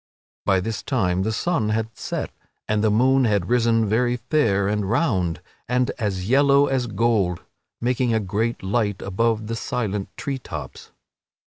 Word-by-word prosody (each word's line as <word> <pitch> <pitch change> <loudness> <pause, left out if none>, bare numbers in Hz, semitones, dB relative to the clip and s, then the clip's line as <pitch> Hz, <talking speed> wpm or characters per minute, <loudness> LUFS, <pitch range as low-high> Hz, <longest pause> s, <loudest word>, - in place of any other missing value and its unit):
By 95 -2 +3
this 110 +2 -3
time 95 -9 0
the 110 +3 0
sun 110 -1 0
had 110 0 -2
set - - -4 0.4
and 105 0 +1
the 110 - +4
moon 130 +5 +3
had 100 -4 +1
risen 115 -2 +3
very 120 +4 +1
fair 115 -6 +1
and 105 -1 -1
round 105 - 0 0.3
and 125 0 +1
as 95 -4 -2
yellow 140 +3 +5
as 130 -3 0
gold, 105 -5 +1 0.4
making 125 0 0
a 110 - +2
great 110 +4 -2
light 105 -1 -1
above 110 +3 0
the 115 +1 -3
silent 105 -4 -3
tree 135 -2 -3
tops. 75 - -8
110 Hz, 155 wpm, -23 LUFS, 100-125 Hz, 0.4 s, yellow